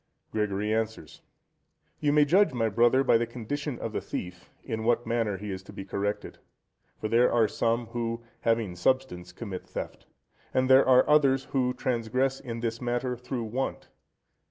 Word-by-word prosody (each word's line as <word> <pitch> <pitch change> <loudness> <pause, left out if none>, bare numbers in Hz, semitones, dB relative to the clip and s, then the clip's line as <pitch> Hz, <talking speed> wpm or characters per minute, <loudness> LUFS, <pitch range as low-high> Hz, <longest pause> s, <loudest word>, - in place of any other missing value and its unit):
Gregory 105 0 -1
answers.—You 110 - -5
may 150 0 +5
judge, 185 +3 +4
my 115 -2 +1
brother, 120 +5 +4
by 115 - +4
the 120 - -1
condition 125 +4 -4
of - - -5
the - - -2
thief, 90 0 -6
in 110 -3 -4
what 120 +1 +2
manner 115 -4 0
he 105 +1 -6
is 95 0 -5
to 95 - -13
be 95 - -8
corrected. 100 +1 -3 0.6
For 110 - -2
there 120 +3 +4
are 115 -2 +4
some, 115 +2 0
who, 115 0 -4 0.2
having 115 -5 0
substance, 90 -3 0
commit 95 -1 -7
theft; - - -7 0.5
and 130 0 +3
there 130 +1 +6
are 130 -1 +6
others, 135 -3 +4
who 125 -2 +1
transgress 130 +2 0
in 115 -3 -6
this 115 0 -3
matter 125 +1 -1
through 125 0 -4
want. 125 +5 -3
115 Hz, 165 wpm, -28 LUFS, 110-130 Hz, 0.6 s, there